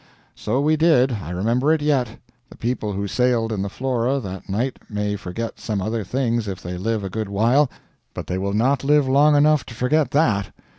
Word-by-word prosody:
So 125 +6 -1
we 155 +2 +2
did. 145 -5 +4
I 100 -9 -5
remember 115 - +1
it 160 - +3
yet. 135 -6 +1 0.4
The - - -14
people 115 -3 -2
who 100 +1 -3
sailed 120 0 +1
in 100 - -2
the 100 - -2
Flora 130 +2 -1
that 95 -6 -8
night 120 +7 -2
may 105 -1 -2
forget 105 +3 -6
some 105 -3 -3
other 110 +3 -2
things 120 +1 -1
if 95 -2 -4
they 90 +1 -6
live 110 +3 -2
a 95 - -4
good 110 0 -3
while, 120 +8 +3 0.5
but - - -5
they 90 - -3
will 100 +1 -2
not 130 +6 +1
live 145 0 +3
long 145 +3 +4
enough 150 -1 +4
to 115 - -9
forget 145 +6 +1
that. 110 - +1
115 Hz, 205 wpm, -22 LUFS, 100-135 Hz, 0.5 s, did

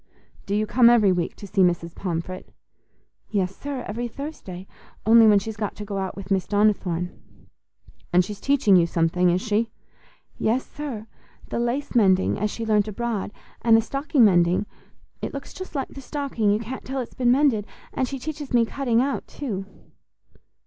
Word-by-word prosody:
"Do 200 - 0
you 215 +1 +1
come 235 +2 +5
every 220 -5 +5
week 175 -2 -1
to - - -10
see 195 0 0
Mrs. 170 -2 +1
Pomfret?" 185 0 -5 0.8
"Yes, 195 -2 -1
sir, 280 -3 -5
every 235 +4 -3
Thursday, 230 - -8 0.4
only 225 0 +7
when 210 -1 +6
she's 215 +2 -3
got 210 -1 -3
to 210 - -7
go 200 -1 -3
out 190 -1 -3
with 195 0 -9
Miss 190 -2 +1
Donnithorne." 195 -4 +1 1.0
"And 180 0 +4
she's 205 +1 -8
teaching 270 -8 +4
you 170 -2 +5
something, 170 +2 +2
is 180 +1 +1
she?" 225 +1 0 0.7
"Yes, 240 +4 +1
sir, 265 -8 -6 0.4
the - - -2
lace 240 +4 -2
mending 190 -6 +3
as 210 +1 0
she 225 +2 -5
learnt 210 -1 +2
abroad, 215 -1 -3 0.3
and 225 -1 +6
the - - +3
stocking 275 +1 +2
mending—it 180 +1 -1
looks 275 - -7
just 375 -3 -9
like 275 - -2
the 275 - -10
stocking, 270 -6 -1
you 205 - +3
can't 235 +4 -6
tell 270 +1 -4
it's 245 - -5
been 250 -2 +1
mended; 250 -6 +3 0.3
and 260 - 0
she 275 - -4
teaches 290 0 -6
me 235 -1 +5
cutting 245 -1 +1
out 275 0 -2
too." 200 -9 -5
215 Hz, 175 wpm, -24 LUFS, 190-250 Hz, 1.0 s, only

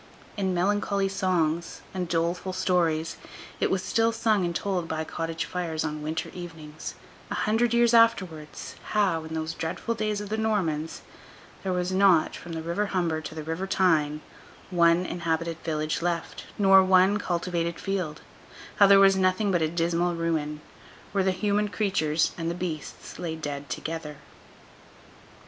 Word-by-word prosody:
In 190 -3 0
melancholy 200 +1 +1
songs, 170 -4 0
and 185 -2 -2
doleful 170 +3 -1
stories, 170 -4 +1 0.4
it - - +2
was 190 -1 0
still 225 +3 +2
sung 220 -3 +1
and 170 -1 -2
told 185 -3 -1
by 160 -1 -2
cottage 165 +1 -3
fires 165 -3 -3
on 155 -1 -4
winter 155 +2 -3
evenings, 160 -4 -8 0.3
a - - -3
hundred 225 +2 +1
years 235 0 +4
afterwards, 185 -10 +2 0.2
how, 190 -7 +2
in 160 0 -6
those 160 0 -2
dreadful 165 +9 -3
days 215 -2 -1
of 205 -1 -6
the 220 +1 -1
Normans, 165 -8 -1 0.6
there 190 - -2
was 180 0 -1
not, 185 -4 +4
from 170 - -8
the 160 0 -4
River 170 +5 -1
Humber 170 -5 0
to 155 0 -8
the 155 - -5
River 165 +5 -3
Tyne, 155 -6 +2 0.5
one 170 0 +4
inhabited 165 -1 -2
village 155 -1 -1
left, 170 -1 -3
nor 195 -1 +7
one 185 +2 +4
cultivated 170 -2 -2
field—how 195 +2 -1
there 195 0 +8
was 195 0 +6
nothing 190 +2 +2
but 175 -3 +2
a 160 - +3
dismal 170 +1 0
ruin, 155 -3 -2 0.5
where 195 -1 +1
the 190 - +2
human 205 +2 +1
creatures 180 -6 +1
and 165 0 -1
the 170 - -2
beasts 170 -4 -6
lay 165 -2 -3
dead 145 -3 -5
together. 155 +2 -5
175 Hz, 155 wpm, -27 LUFS, 160-195 Hz, 0.6 s, there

